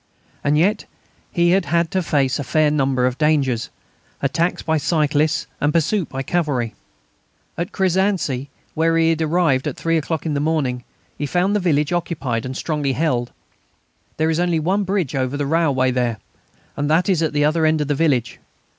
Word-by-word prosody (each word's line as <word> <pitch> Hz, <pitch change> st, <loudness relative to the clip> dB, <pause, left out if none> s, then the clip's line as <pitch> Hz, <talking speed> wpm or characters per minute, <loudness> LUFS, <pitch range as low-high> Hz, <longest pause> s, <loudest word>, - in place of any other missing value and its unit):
And 145 Hz, +1 st, +2 dB
yet 200 Hz, +6 st, +2 dB, 0.5 s
he 170 Hz, -1 st, +2 dB
had 190 Hz, -1 st, +2 dB
had 170 Hz, +2 st, +1 dB
to 190 Hz, -, +1 dB
face 140 Hz, -6 st, 0 dB
a -, -, -2 dB
fair 150 Hz, +4 st, +2 dB
number 135 Hz, -3 st, +1 dB
of 125 Hz, 0 st, -1 dB
dangers 140 Hz, -7 st, +1 dB, 0.5 s
attacks 165 Hz, +6 st, 0 dB
by 160 Hz, -1 st, +1 dB
cyclists 155 Hz, 0 st, +1 dB
and 145 Hz, -, +1 dB
pursuit 170 Hz, +3 st, 0 dB
by 135 Hz, 0 st, -4 dB
cavalry. 135 Hz, -8 st, -1 dB, 0.8 s
At 170 Hz, +1 st, -3 dB
Crézancy, 185 Hz, -8 st, 0 dB, 0.3 s
where 165 Hz, +1 st, +2 dB
he 165 Hz, 0 st, +3 dB
arrived 160 Hz, -4 st, +1 dB
at -, -, -4 dB
three 165 Hz, 0 st, +1 dB
o'clock 160 Hz, 0 st, -3 dB
in 155 Hz, -, -1 dB
the 140 Hz, -, 0 dB
morning, 140 Hz, -5 st, -1 dB, 0.4 s
he 145 Hz, -, -1 dB
found 180 Hz, +7 st, +1 dB
the -, -, +2 dB
village 155 Hz, -3 st, +1 dB
occupied 140 Hz, -9 st, -2 dB
and 130 Hz, +1 st, -5 dB
strongly 150 Hz, -4 st, -1 dB
held. 125 Hz, -6 st, 0 dB, 0.9 s
There 160 Hz, +1 st, +1 dB
is 160 Hz, -, 0 dB
only 175 Hz, -2 st, +1 dB
one 190 Hz, +6 st, 0 dB
bridge 185 Hz, -7 st, -1 dB
over 130 Hz, +1 st, -1 dB
the 145 Hz, -, -1 dB
railway 140 Hz, -4 st, +2 dB
there, 120 Hz, -3 st, 0 dB, 0.6 s
and 145 Hz, +1 st, -2 dB
that 165 Hz, +5 st, +3 dB
is 185 Hz, -5 st, +2 dB
at 160 Hz, -, +1 dB
the 145 Hz, 0 st, +2 dB
other 160 Hz, +2 st, +1 dB
end 155 Hz, 0 st, +2 dB
of 150 Hz, -, -1 dB
the 145 Hz, -, +1 dB
village. 135 Hz, -6 st, 0 dB
155 Hz, 180 wpm, -20 LUFS, 135-170 Hz, 0.9 s, he